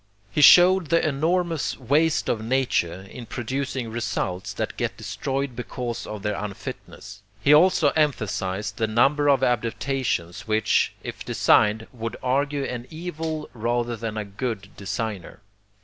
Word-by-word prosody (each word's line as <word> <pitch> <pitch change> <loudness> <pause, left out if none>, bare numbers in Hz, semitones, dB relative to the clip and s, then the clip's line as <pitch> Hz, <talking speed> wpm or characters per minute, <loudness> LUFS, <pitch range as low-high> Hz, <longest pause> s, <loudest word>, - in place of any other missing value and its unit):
He 150 - +1
showed 180 +2 +7
the 165 +1 +2
enormous 165 +2 0
waste 145 +5 +1
of 110 -2 -1
nature 110 -8 0
in 115 +4 -10
producing 130 0 -3
results 100 -4 -3
that - - -3
get - - -3
destroyed 135 -1 -3
because 120 -1 -5
of 105 -2 -7
their 105 -1 0
unfitness. 100 0 -8 0.2
He 140 +6 +4
also 160 -1 +5
emphasized 105 -9 -1
the 110 - +1
number 140 +6 +3
of 135 -2 +4
adaptations 115 -6 -1
which, 110 0 +2
if - - -6
designed, 105 +1 +3
would 115 -2 -5
argue 140 +2 0
an 125 -2 -5
evil 160 -2 -5
rather 120 +1 -1
than 110 -1 -5
a 105 - -3
good 100 -1 -5
designer. 100 -1 -5
120 Hz, 135 wpm, -24 LUFS, 105-140 Hz, 0.2 s, showed